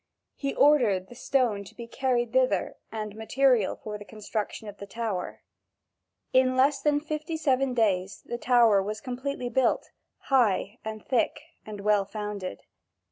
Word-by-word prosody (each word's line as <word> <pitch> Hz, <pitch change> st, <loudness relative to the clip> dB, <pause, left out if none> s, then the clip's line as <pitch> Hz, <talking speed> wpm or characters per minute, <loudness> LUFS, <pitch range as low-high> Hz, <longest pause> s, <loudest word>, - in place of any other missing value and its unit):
He 275 Hz, -1 st, -3 dB
ordered 235 Hz, -11 st, +4 dB
the -, -, -10 dB
stone 245 Hz, -4 st, 0 dB
to 195 Hz, -, -14 dB
be 235 Hz, -, -7 dB
carried 240 Hz, -1 st, -1 dB
thither 255 Hz, -7 st, +2 dB, 0.2 s
and 215 Hz, -1 st, -4 dB
the 210 Hz, -, -14 dB
material 245 Hz, -1 st, +2 dB
for 210 Hz, -1 st, -7 dB
the -, -, -8 dB
construction 215 Hz, 0 st, -5 dB
of 205 Hz, 0 st, -8 dB
the 200 Hz, -, -9 dB
tower. 210 Hz, -4 st, -4 dB, 0.9 s
In 255 Hz, 0 st, +4 dB
less 275 Hz, +1 st, +3 dB
than 290 Hz, 0 st, +2 dB
fifty 305 Hz, +2 st, -4 dB
seven 270 Hz, -4 st, +1 dB
days 195 Hz, -5 st, 0 dB
the 240 Hz, -, -5 dB
tower 235 Hz, -6 st, +5 dB
was 210 Hz, +2 st, -4 dB
completely 260 Hz, 0 st, -4 dB
built, 260 Hz, -1 st, +1 dB, 0.3 s
high 230 Hz, -3 st, +2 dB
and 215 Hz, -1 st, -6 dB
thick 245 Hz, -4 st, +1 dB, 0.3 s
and 210 Hz, -2 st, -7 dB
well 205 Hz, -1 st, +3 dB
founded. 205 Hz, -, -5 dB
230 Hz, 155 wpm, -27 LUFS, 210-260 Hz, 0.9 s, tower